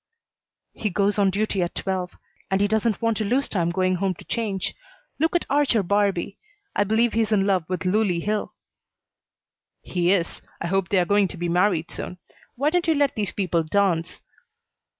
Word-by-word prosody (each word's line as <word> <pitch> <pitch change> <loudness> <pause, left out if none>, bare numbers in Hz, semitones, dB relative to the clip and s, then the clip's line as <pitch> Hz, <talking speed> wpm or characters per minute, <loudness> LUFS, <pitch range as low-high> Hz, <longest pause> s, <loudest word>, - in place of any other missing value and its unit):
"He 215 - -2
goes 200 +2 +1
on 200 -1 +4
duty 200 0 0
at 175 - -2
twelve, 185 -2 -3 0.3
and 190 - +1
he 205 - +3
doesn't 220 +1 0
want 230 -2 +2
to 220 - -1
lose 255 +7 +1
time 170 -4 0
going 185 +1 +1
home 190 0 0
to - - -14
change. 210 -5 -2 0.5
Look 320 +3 +1
at 350 - +2
Archer 275 -6 +2
Barbee. 200 0 0 0.4
I 205 - +3
believe 225 +3 +2
he's 225 -1 +1
in 200 -2 +3
love 190 -4 +1
with 185 -1 -3
Loulie 185 -2 +1
Hill." 210 0 -2 1.3
"He 175 0 +1
is. 175 -4 0 0.2
I - - -4
hope 190 0 0
they 200 - +2
are 180 - +3
going 205 +1 +3
to 180 - -8
be 175 0 -2
married 175 -2 +1
soon. 180 - -6 0.4
Why 285 +5 +1
don't 355 0 +1
you 320 - +3
let 285 -2 +2
these 210 -2 -1
people 180 -4 0
dance?" 170 0 0
200 Hz, 190 wpm, -24 LUFS, 180-220 Hz, 1.3 s, on